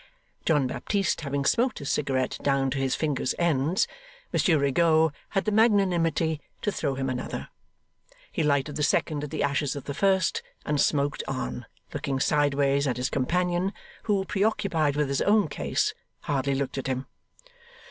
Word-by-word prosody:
John 150 -4 +3
Baptist 195 +8 -1
having 140 -1 -2
smoked 240 - +2
his 140 - -3
cigarette 130 -2 0
down 135 -1 +1
to 135 - -1
his 135 -1 +1
fingers' 145 -5 -1
ends, 165 +1 +2 0.5
Monsieur 170 -6 +3
Rigaud 160 +3 +3 0.2
had 195 -2 0
the 215 - +1
magnanimity 175 -8 +2 0.2
to 205 - +1
throw 140 -7 -2
him 135 0 -2
another. 130 -1 -4 0.8
He - - -1
lighted 145 -1 +1
the - - -2
second 150 0 +1
at 150 - -4
the - - -2
ashes 140 0 0
of 140 - -6
the 140 - -5
first, 190 +2 +2 0.2
and 150 -1 +1
smoked 145 -1 +1
on, 130 -2 -4 0.3
looking 140 -2 -2
sideways 140 -1 +2
at 125 - -1
his 125 +1 -1
companion, 180 +7 0 0.3
who, 200 -3 +1
preoccupied 190 -8 +1
with 150 -1 +1
his 140 0 0
own 205 -3 +4
case, 75 - -1 0.3
hardly 140 -1 0
looked 135 0 -2
at 135 - -4
him. 130 0 -2
145 Hz, 160 wpm, -27 LUFS, 135-175 Hz, 0.8 s, own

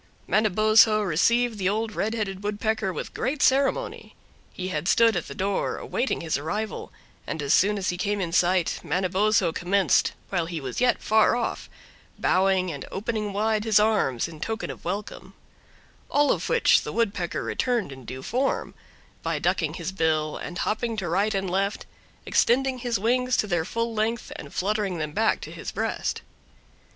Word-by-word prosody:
Manabozho 215 0 +4
received 225 +6 +2
the 185 -1 +1
Old 220 +2 -1
Red 220 +3 -1
Headed 195 -3 -3
Woodpecker 210 -1 -1
with - - -6
great 285 +2 -1
ceremony. 280 - +1 0.4
He 185 0 -5
had 160 -1 -3
stood 230 0 +4
at 175 - -2
the 140 - -8
door 195 +1 -1
awaiting 255 - -2
his 160 -3 -1
arrival, 210 +9 -4 0.4
and - - -4
as 140 +1 +1
soon 205 +2 +3
as 190 -2 -1
he 180 - -2
came 205 +1 0
in 175 -3 -2
sight 180 0 +2
Manabozho 190 +1 +1
commenced, 190 +3 +2 0.2
while 175 -4 -1
he 170 -1 -4
was 135 - -5
yet 250 -1 +2
far 220 +1 +4
off, 240 -1 -3 0.5
bowing 185 -1 +2
and 140 -3 -6
opening 215 0 -2
wide 215 +1 0
his 215 -2 +4
arms, 205 - +1
in 160 -2 -11
token 225 +6 -3
of - - -12
welcome; 195 +4 -5 0.7
all 290 0 +3
of - - -1
which 475 - +4
the - - -5
Woodpecker 200 -6 -1
returned 240 - -1
in 130 -1 -10
due 130 +2 -7
form, 265 +3 -1 0.5
by - - -1
ducking - - 0
his - - -4
bill 160 -4 0
and 175 - -6
hopping 225 +1 -1
to 190 -4 -2
right 200 +5 +1
and 195 0 -1
left, 195 +3 -1 0.4
extending 260 +2 +2
his 240 -2 -1
wings 250 +4 +1
to - - +2
their 175 -5 0
full 230 +3 -2
length 220 +2 -1
and 140 - -9
fluttering 200 -1 -1
them 155 -2 -3
back 220 +8 +1
to - - -8
his - - -6
breast. - - -2
205 Hz, 175 wpm, -25 LUFS, 180-225 Hz, 0.7 s, Manabozho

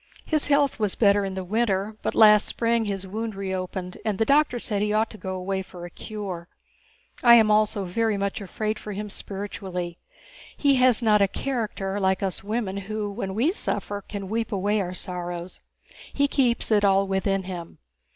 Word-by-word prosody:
His 310 -2 +1
health 285 -3 +2
was 210 -3 0
better 205 -2 +4
in 195 -1 -3
the 190 - -3
winter, 210 0 0
but - - -2
last 210 -1 +7
spring 230 -1 +1
his 195 -2 -3
wound 220 +2 -4
reopened 185 -1 -4
and 210 -3 -1
the 225 - +2
doctor 285 -2 +3
said 210 -3 -2
he 210 0 +1
ought 215 +1 +1
to 215 - -10
go 190 -1 -4
away 190 +1 -2
for 180 -2 -10
a 175 - -9
cure. 195 -6 -6 0.7
And 240 - +3
I - - +11
am 220 -2 +5
also 210 -2 +2
very 215 +3 0
much 200 +1 -2
afraid 215 +2 -3
for 210 - -6
him 210 +1 -5
spiritually. 190 -4 -5 0.6
He 280 -2 +3
has 250 -2 +4
not 210 -2 +4
a 200 - +5
character 205 -4 -3
like 190 0 +1
us 190 -1 -2
women 210 -2 -2
who, 205 +1 -3
when 195 -1 -4
we 260 +10 +2
suffer, 205 - -3
can 200 0 -7
weep 225 +3 -2
away 205 +1 +1
our 180 -1 -4
sorrows. 175 -1 -6 0.5
He 285 0 +3
keeps 245 -5 +2
it 210 -1 +4
all 195 0 +4
within 195 0 0
him. 180 -2 -7
205 Hz, 190 wpm, -25 LUFS, 190-220 Hz, 0.7 s, I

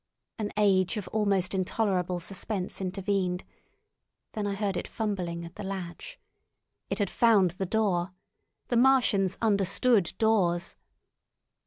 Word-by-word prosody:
An 210 -1 -2
age 195 -1 +3
of 210 - -5
almost 200 -4 +1
intolerable 185 -2 0
suspense 190 +2 -4
intervened; 190 -1 -1 0.9
then 210 -2 -3
I 200 - -2
heard 200 -2 -1
it - - -3
fumbling 180 -6 -3
at 170 - -12
the 210 - -6
latch! 195 - -6 0.7
It 195 - -2
had 205 -3 -1
found 210 -7 +4
the 190 +2 -4
door! 190 -4 0 0.6
The 240 - +2
Martians 230 -7 +3
understood 200 -2 +2
doors! 190 -6 +1
195 Hz, 125 wpm, -28 LUFS, 180-215 Hz, 0.9 s, found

